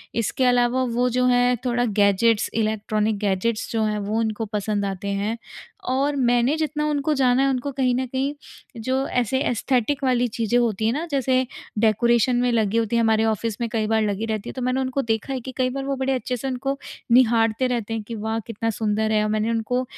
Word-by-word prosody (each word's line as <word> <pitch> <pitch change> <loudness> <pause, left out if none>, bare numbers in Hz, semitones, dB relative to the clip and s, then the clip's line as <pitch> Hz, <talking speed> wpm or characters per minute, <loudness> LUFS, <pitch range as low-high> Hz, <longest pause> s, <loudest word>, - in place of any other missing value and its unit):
इसके 235 +3 0
अलावा 245 +1 +3
वो 245 0 0
जो 250 +1 +1
है 245 0 +3
थोड़ा 245 0 +1
गैजेट्स, 205 +1 +2
इलेक्ट्रॉनिक 215 -1 0
गैजेट्स 210 +2 -1
जो 225 -1 0
हैं 215 -1 0
वो 210 +2 -2
उनको 220 0 -1
पसंद 205 -1 -2
आते 195 0 -4
हैं। 200 +3 -1 0.5
और 275 +3 +1
मैंने 245 +1 +2
जितना 305 -1 -1
उनको 295 0 0
जाना 255 0 +4
है 275 - +3
उनको 265 +2 -2
कहीं 255 -2 +2
न 260 +1 -1
कहीं 265 +3 -2 0.5
जो 260 +3 -1
ऐसे 250 +1 0
एस्थेटिक 255 +3 0
वाली 250 -2 +2
चीज़ें 230 +1 0
होती 220 -3 0
हैं 225 - +2
ना 315 +4 -2
जैसे 260 -1 +1 0.3
डेकोरेशन 235 +3 +3
में 245 0 +2
लगी 220 -2 +1
होती 230 0 0
है 235 - +3
हमारे 220 -1 +3
ऑफ़िस 220 0 -1
में 235 - 0
कई 215 -1 -1
बार 220 0 +2
लगी 210 0 -1
रहती 215 -2 -3
है। - - -7
तो 260 - -6
मैंने 255 +1 0
उनको 260 +1 -1
देखा 225 +2 -2
है 260 - -2
कि 260 - -7
कई 255 -1 +1
बार 270 +2 -4
वो 275 0 -1
बड़े 265 0 0
अच्छे 250 -1 -2
से 270 - -5
उनको 270 +2 -2 0.3
निहारते 235 0 +4
रहते 230 -3 -2
हैं, 225 - -3
कि 230 +2 -7
वाह! 220 +1 -2
कितना 225 0 -2
सुंदर 220 0 0
है। 215 -1 +2
और 215 - -1
मैंने 215 +1 0
उनको 230 +3 -1
235 Hz, 215 wpm, -23 LUFS, 220-255 Hz, 0.5 s, जाना